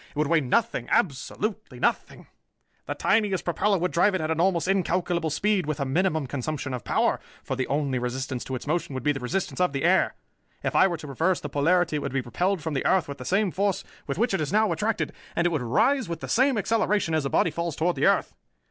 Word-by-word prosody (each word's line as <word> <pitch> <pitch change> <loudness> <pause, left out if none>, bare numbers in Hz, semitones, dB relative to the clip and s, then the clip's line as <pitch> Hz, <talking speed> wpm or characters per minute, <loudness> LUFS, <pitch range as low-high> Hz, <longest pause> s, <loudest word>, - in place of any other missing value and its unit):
It - - -25
would 150 +1 +1
weigh 165 +2 +3
nothing, 225 - 0
absolutely 185 - -1
nothing! - - -1 0.6
The - - -3
tiniest 200 -3 +1
propeller 195 +4 +1
would 180 +1 -1
drive 190 +3 +3
it 185 - -1
at 160 +1 -1
almost 175 -1 +2
incalculable 180 -3 0
speed 195 +2 +1
with 155 -1 -2
a 140 - 0
minimum 160 +1 +1
consumption 140 +1 -4
of 125 - -4
power, - - +1 0.2
for 135 - -3
the 130 -1 -2
only 140 -3 0
resistance 125 +1 -3
to 130 - -4
its 125 - -6
motion 155 -2 -2
would 130 - -4
be 150 - +3
the 140 - -3
resistance 180 +9 -2
of 180 -5 +2
the 135 - -2
air. 185 +3 +3 0.5
If - - -2
I 190 - +6
were 175 -3 -2
to 155 - -10
reverse 165 +6 0
the 145 - -6
polarity, 160 +3 +2
it - - -1
would 140 -2 -4
be 135 - +1
repelled 175 - -1
from 160 - -3
the 135 - -1
earth 190 -4 +2
with 140 - -7
the 125 - -7
same 195 - +1
force 195 +1 0 0.2
with 140 - -3
which 235 +1 +1
it 190 - +1
is 150 - -2
now 215 0 +3
attracted, 220 +1 -1 0.2
and 170 - +1
it 175 - +3
would 155 -5 -1
rise 220 - +2
with 170 -2 -4
the - - -5
same 260 0 +3
acceleration 210 -4 +1
as 155 -2 +1
a 135 - -1
body 165 - +2
falls 170 0 -3
toward 170 +2 0
the - - +2
earth. - - +2
165 Hz, 240 wpm, -26 LUFS, 140-190 Hz, 0.6 s, I